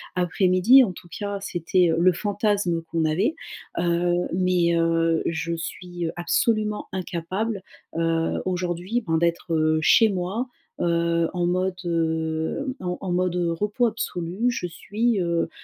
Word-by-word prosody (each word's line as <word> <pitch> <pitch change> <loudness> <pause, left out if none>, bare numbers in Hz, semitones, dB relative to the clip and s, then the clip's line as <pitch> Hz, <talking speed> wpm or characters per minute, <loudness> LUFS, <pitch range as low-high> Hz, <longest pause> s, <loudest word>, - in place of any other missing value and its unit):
après-midi. 185 +7 +5
En 195 -7 -2
tout 175 - -13
cas 200 -1 -3
c'était, 175 -1 +1
heu, 160 - 0
le 185 +2 +5
fantasme 205 -3 0
qu'on 165 -1 0
avait, 195 - +1 0.4
heu. 175 +1 +1
Mais, 180 -2 +2
heu, 165 0 +2
je 170 +1 -2
suis, 175 +1 -5
heu, - - -2
absolument 210 +4 0
incapable, 190 +4 -3 0.4
heu, 165 0 0
aujourd'hui, 180 +5 -1
ben, 160 0 +2
d'être, 170 0 0
heu, 155 0 +2
chez 225 +8 +6
moi, 195 +6 -2 0.3
heu, 170 -1 +1
en 175 -1 0
mode, 185 +1 0
heu, 160 - -1
en 180 -1 -3
en 190 - -3
mode, 180 0 +1
heu, 175 -1 0
repos 210 +8 0
absolu 200 +1 -2
je 235 - -3
suis, 210 +5 -1
heu, 170 -1 0
175 Hz, 145 wpm, -24 LUFS, 170-200 Hz, 0.4 s, chez